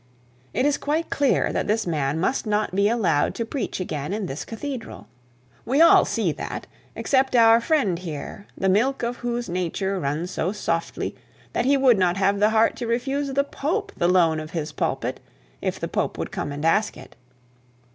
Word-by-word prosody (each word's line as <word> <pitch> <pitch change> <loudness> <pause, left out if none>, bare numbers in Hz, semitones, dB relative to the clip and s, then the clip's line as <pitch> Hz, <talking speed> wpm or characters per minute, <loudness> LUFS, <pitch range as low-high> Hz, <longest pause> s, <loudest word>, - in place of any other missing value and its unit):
'It 255 - +2
is 290 -1 +2
quite 310 +3 -1
clear 280 -2 +2
that - - -1
this 215 +1 +1
man 150 -3 -1
must 230 +6 0
not 210 -2 0
be 200 +2 +3
allowed 185 -11 +1
to 230 - -2
preach 250 -3 -4
again 150 -2 -3
in 210 -1 -2
the 135 - -5
cathedral. 255 +1 -6 0.6
We 270 +5 +1
all 335 - +7
see - - 0
that, - - -6 0.3
except 265 -1 +1
our 230 -1 +7
dear - - -7
friend 235 - +1
here, 170 +3 -7
the 190 - 0
milk 240 +8 +2
of 240 +1 -2
whose 240 0 -3
nature 185 +2 -2
runs 155 +4 -2
so 185 +3 -1
softly, 170 -5 -2 0.4
that 240 - 0
he 280 +1 +4
would 255 -6 +4
not 180 0 +2
have 200 +1 +2
the 210 +1 +4
heart 220 +1 +3
to 240 - -4
refuse 270 +4 -1
the 280 +1 +2
Pope, 375 +9 -2
the 175 - +1
loan 170 -3 +3
of 155 0 -7
his 155 -2 -4
pulpit, - - -2 0.4
if - - -2
the - - -3
Pope - - -2
would - - -4
come - - -3
and 145 +2 -4
ask 210 +6 +2
it. - - -13
210 Hz, 195 wpm, -24 LUFS, 175-260 Hz, 0.6 s, all